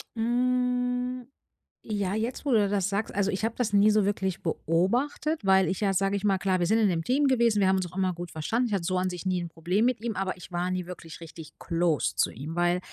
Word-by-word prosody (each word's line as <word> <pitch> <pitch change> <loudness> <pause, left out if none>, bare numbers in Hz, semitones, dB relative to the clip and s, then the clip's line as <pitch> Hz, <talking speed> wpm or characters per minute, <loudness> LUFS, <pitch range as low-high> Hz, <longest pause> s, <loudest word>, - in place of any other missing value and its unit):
Hm, 250 +1 0 0.6
ja, 205 -2 -1
jetzt, 235 +6 -3
wo - - +2
du 210 -3 +4
das 200 -1 0
sagst, 200 +2 -2
also, 200 0 +1
ich 200 +3 -1
habe 225 - -1
das 240 -4 -1
nie 205 +1 +5
so 210 -2 +3
wirklich 190 -2 -1
beobachtet, 235 - 0
weil 190 -1 +5
ich 190 +3 -2
ja, 195 -2 +2
sage 195 +2 +1
ich 200 - -3
mal 195 -2 +2
klar, 190 -1 +1
wir 175 - 0
sind 220 +5 +2
in 215 - +4
'nem 165 -3 0
Team 275 - +2
gewesen, 235 -5 +3
wir 190 - +3
haben 190 - +4
uns 185 -3 -2
auch - - -15
immer 190 -1 +1
gut 175 0 -7
verstanden, 230 +10 -1
ich - - -3
hatte 180 -4 -1
so 185 0 0
an 185 0 0
sich 180 +1 -6
nie 185 -1 +1
'n 170 -1 -5
Problem 180 +8 0
mit 250 -3 0
ihm, 230 -3 -2
aber 190 0 -2
ich 180 0 -13
war 175 +1 -1
nie 180 -1 -3
wirklich 165 -3 -9
richtig 160 -1 -10
close 165 -5 0
zu - - +1
ihm, 150 +7 -7
weil 175 +1 +2
195 Hz, 255 wpm, -27 LUFS, 180-225 Hz, 0.6 s, nie